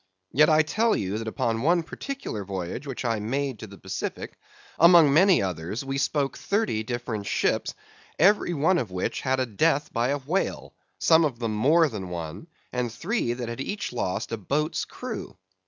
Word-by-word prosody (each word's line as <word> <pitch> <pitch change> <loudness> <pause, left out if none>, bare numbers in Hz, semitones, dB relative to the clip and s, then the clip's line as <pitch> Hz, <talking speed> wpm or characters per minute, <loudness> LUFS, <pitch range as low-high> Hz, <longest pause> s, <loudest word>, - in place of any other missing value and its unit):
Yet 150 +4 +5
I 155 0 +5
tell 215 +9 +1
you 100 +2 -2
that 115 - -6
upon 115 +1 -1
one 170 +5 +3
particular 210 - -5
voyage 95 - -5
which 130 -1 -5
I 115 -2 0
made 130 +2 -2
to 110 - -8
the 100 0 -13
Pacific, 95 0 -5 0.5
among 170 -4 +7
many 175 - +5
others 95 - -4
we 135 0 -2
spoke 140 0 0
thirty 205 - 0
different 110 -3 -4
ships, - - 0 0.4
every 190 -1 +3
one 165 +5 +3
of 115 - -3
which 90 0 -3
had 130 0 +1
had - - -2
a - - -17
death 145 +6 +1
by 120 +1 +1
a 140 +2 +1
whale, 150 +8 -2 0.2
some 165 0 +5
of 140 -6 -1
them 115 -2 -2
more 155 +10 +4
than 100 -8 -6
one, 85 - -6 0.3
and 125 -2 -1
three 160 - -1
that 120 -1 -5
had 115 +3 -5
each 200 +3 -4
lost 95 -5 -2
a 115 - -2
boat's 150 - -1
crew. 250 - -7
130 Hz, 190 wpm, -26 LUFS, 110-160 Hz, 0.5 s, among